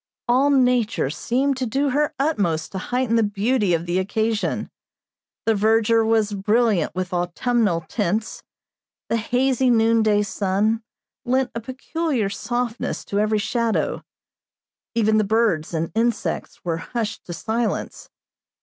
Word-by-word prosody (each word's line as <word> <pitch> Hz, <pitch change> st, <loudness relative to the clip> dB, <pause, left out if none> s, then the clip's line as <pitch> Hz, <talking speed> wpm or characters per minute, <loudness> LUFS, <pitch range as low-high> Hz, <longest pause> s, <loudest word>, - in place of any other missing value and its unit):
All 260 Hz, +4 st, +4 dB
Nature 250 Hz, -, +2 dB
seemed 265 Hz, -, 0 dB
to 260 Hz, -1 st, -2 dB
do 275 Hz, +4 st, 0 dB
her 295 Hz, +3 st, 0 dB
utmost 190 Hz, -, 0 dB
to 190 Hz, -, -4 dB
heighten 245 Hz, +2 st, 0 dB
the -, -, +4 dB
beauty 205 Hz, -1 st, +1 dB
of 165 Hz, +1 st, -3 dB
the 175 Hz, +1 st, 0 dB
occasion. 220 Hz, +3 st, -1 dB, 0.7 s
The 225 Hz, -, +3 dB
verdure 225 Hz, +2 st, +3 dB
was 220 Hz, -2 st, +2 dB
brilliant 210 Hz, -3 st, +1 dB
with 185 Hz, 0 st, -3 dB
autumnal 180 Hz, +2 st, 0 dB
tints, 215 Hz, +1 st, -2 dB, 0.7 s
the 230 Hz, -, +2 dB
hazy 255 Hz, +3 st, +1 dB
noonday 225 Hz, -2 st, +3 dB
sun 205 Hz, +3 st, 0 dB, 0.4 s
lent 260 Hz, 0 st, +1 dB
a 230 Hz, -, -3 dB
peculiar 260 Hz, -1 st, -2 dB
softness 240 Hz, +2 st, -3 dB
to 200 Hz, -, -1 dB
every 215 Hz, +1 st, +2 dB
shadow 230 Hz, +1 st, -1 dB, 0.9 s
even 220 Hz, -1 st, +3 dB
the -, -, +3 dB
birds 210 Hz, -7 st, +1 dB
and 165 Hz, -1 st, -2 dB
insects 230 Hz, -3 st, -2 dB
were 165 Hz, -2 st, -1 dB
hushed 220 Hz, +4 st, -4 dB
to 175 Hz, -, -6 dB
silence. 225 Hz, +5 st, -3 dB
225 Hz, 130 wpm, -22 LUFS, 200-245 Hz, 0.9 s, All